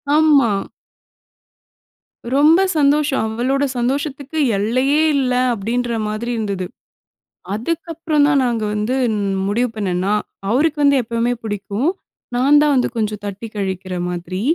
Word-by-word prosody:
ஆமா. 295 -7 +5 1.8
ரொம்ப 305 +5 +5 0.2
சந்தோஷம். 285 -3 +2
அவளோட 250 +5 0
சந்தோஷத்துக்கு 280 +4 -2 0.2
எல்லையே 255 +8 +1 0.2
இல்ல 255 -2 +1 0.2
அப்படின்ற 235 +3 -2 0.2
மாதிரி 215 +3 -3
இருந்தது. 200 -4 -2 0.9
அதுக்கப்புறம் 320 +4 -1
தான் 285 -2 +3
நாங்க 235 -3 -1
வந்து 210 +5 -1 0.5
முடிவு 240 +5 0
பண்ணேனா, 190 -1 -1 0.4
அவருக்கு 295 +6 +2
வந்து 280 -1 +5
எப்பவுமே 235 +1 -1
பிடிக்கும். 205 - -2 0.5
நான் 275 +4 +5
தான் 295 -1 +3
வந்து 250 - +2
கொஞ்சம் 215 -2 -2
தட்டி 205 +3 -6
கழிக்கிற 190 -2 -3
மாதிரி, 180 +2 -4
245 Hz, 110 wpm, -19 LUFS, 210-285 Hz, 1.8 s, ஆமா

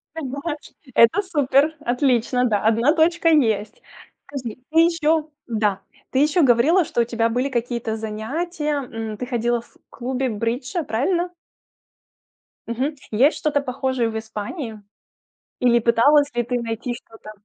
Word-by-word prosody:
Ты 325 - -4
думаешь? 290 +3 -5 0.2
Это 230 - +5
супер, 295 -3 +2
отлично, 250 -2 +1
да, 215 -4 +2
1 230 +7 +3
точка 335 +1 +3
есть. 220 -9 +1 0.5
Скажи, 255 -6 -6
ты 325 - +4
ещё 325 -2 +2 0.2
да. 210 -4 0 0.3
Ты 260 - +1
ещё 300 +3 +3
говорила, 275 +9 +4
что 240 - 0
у - - +4
тебя 230 -1 0
были 250 +4 0
какие-то 235 -2 -2
занятия, 295 +9 -3
м. 225 -3 -6
Ты 250 - -4
ходила 240 -1 0
в 235 - -24
клубе 255 +1 -2
бриджа, 240 - -2
правильно? 345 +9 -1 1.3
Мгм, 260 +6 -2 0.2
есть 260 +8 +3
что-то 290 -2 0
похожее 260 -2 -1
в 220 - -4
Испании? 220 - -6 0.8
Или 240 -1 +4
пыталась 280 +6 +4
ли 240 - +1
ты 245 +1 -2
найти 230 +2 -3
что-то? 225 -2 -12
250 Hz, 140 wpm, -22 LUFS, 230-295 Hz, 1.3 s, Это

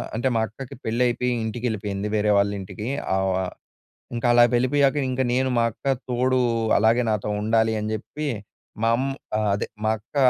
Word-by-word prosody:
అంటే 120 +3 0
మా - - +2
అక్కకి 125 +5 -9
పెళ్లి 115 +3 0
అయిపోయి 125 +1 0
ఇంటికి 115 +2 -4
వెళ్ళిపోయింది 100 -2 -3
వేరే 105 0 +2
వాళ్ళ 100 0 +3
ఇంటికి 105 +4 -7 0.3
ఆవ్ 95 0 +1
ఆహ్, 90 - -5 0.6
ఇంకా 120 +1 0
అలా 120 0 +7
వెళ్ళిపోయాక 140 +3 +3
ఇంక 130 +1 -1
నేను 130 +1 +2
మా 115 - +4
అక్క 115 - -26 0.2
తోడు 130 +1 +2 0.4
అలాగే 115 +3 +3
నాతో 105 0 -1
ఉండాలి 110 +1 +2
అని 105 +1 -3
చెప్పి 150 +8 -5 0.6
మా 115 - +4
అమ్ 135 +2 -1 0.5
అదే, 100 - -1 0.2
మా - - +3
అక్క 105 +7 -25
115 Hz, 175 wpm, -24 LUFS, 105-125 Hz, 0.6 s, అలా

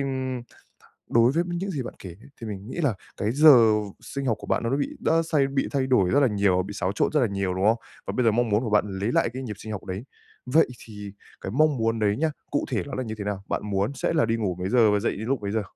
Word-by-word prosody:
ừm, 130 -2 -3 0.7
đối 120 +2 +4
với 170 +3 +1
những 180 +3 -3
gì 140 -7 -3
bạn - - -8
kể 95 - -9
nhé - - -15
thì 115 - -6
mình 100 -1 -6
nghĩ - - -7
là 140 -8 +1 0.2
cái 105 +3 -1
giờ 130 -7 +7 0.3
sinh 140 -1 -5
học 115 - +1
của - - -9
bạn - - 0
nó 115 - -1
bị 145 - -1
đã 165 +1 +2
xay 155 -4 +1
bị 135 0 -1
thay 135 -2 0
đổi 100 -9 +3
rất 145 - +4
là 140 - +5
nhiều, 100 -3 +2
bị 100 +2 -8
xáo 95 -1 -1
trộn - - +1
rất 150 - +3
là 120 - +3
nhiều, 100 -2 -2
đúng 95 +2 -1
không? 110 +2 +4 0.3
Và - - -3
bây 125 - +2
giờ 115 - +5
mong 120 +1 +1
muốn 105 +1 +2
của 115 - -3
bạn 105 0 +3
lấy 100 +4 -2
lại - - +2
cái 130 +1 -5
nhịp 105 -5 -6
sinh 110 - -7
học 100 - -6
đấy, 95 +5 -5 0.4
vậy 150 +6 +4 0.2
thì 105 -3 -9 0.3
cái 95 - -5
mong 155 -1 +3
muốn 115 0 0
đấy 105 -1 +1
nhá, 160 0 +1 0.2
cụ 145 - 0
thể - - 0
nó 140 - -6
là 130 - -2
như 110 -2 -5
thế 100 - -4
nào? 100 -1 -3
Bạn - - -1
muốn 100 +4 -1
sẽ 135 - -1
là 160 - +2
đi 115 -1 +1
ngủ 100 -5 -1
mấy 90 +1 -2
giờ 115 -2 +4
và 105 - +2
dậy 115 - 0
lúc 115 +2 -2
mấy 100 0 -3
giờ? 110 -1 0
115 Hz, 295 wpm, -25 LUFS, 105-135 Hz, 0.7 s, giờ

